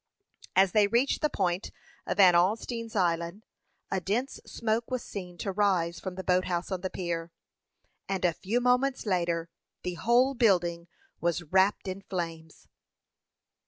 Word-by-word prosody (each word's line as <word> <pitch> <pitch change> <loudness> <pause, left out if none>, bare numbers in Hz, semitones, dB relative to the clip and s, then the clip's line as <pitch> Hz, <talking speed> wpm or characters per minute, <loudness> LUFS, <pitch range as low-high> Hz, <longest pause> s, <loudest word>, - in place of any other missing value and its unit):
As 190 -1 +5
they 210 0 +4
reached 240 +6 +1
the 300 - +2
point 180 -5 -1 0.4
of - - -1
Van 185 -3 +7
Alstine's 225 +6 0
Island, 170 +2 0 0.5
a 190 - 0
dense 235 +9 -2
smoke 230 0 -1
was 255 -2 -2
seen 180 -3 -7
to 195 - -3
rise 185 -4 +1
from 185 -1 -6
the 190 - -5
boat 185 0 +2
house 175 +1 -2
on 185 -1 -2
the 185 - -2
pier; 170 -2 -4 0.8
and 190 -2 0
a 175 - +3
few 215 +8 -1
moments 250 +2 +2
later, 170 -4 0 0.4
the 180 - -2
whole 240 +9 +3
building 175 -8 +2 0.3
was 170 0 0
wrapped 190 +5 +2
in 190 +1 -4
flames. 165 -4 -6
190 Hz, 155 wpm, -29 LUFS, 175-220 Hz, 0.8 s, Van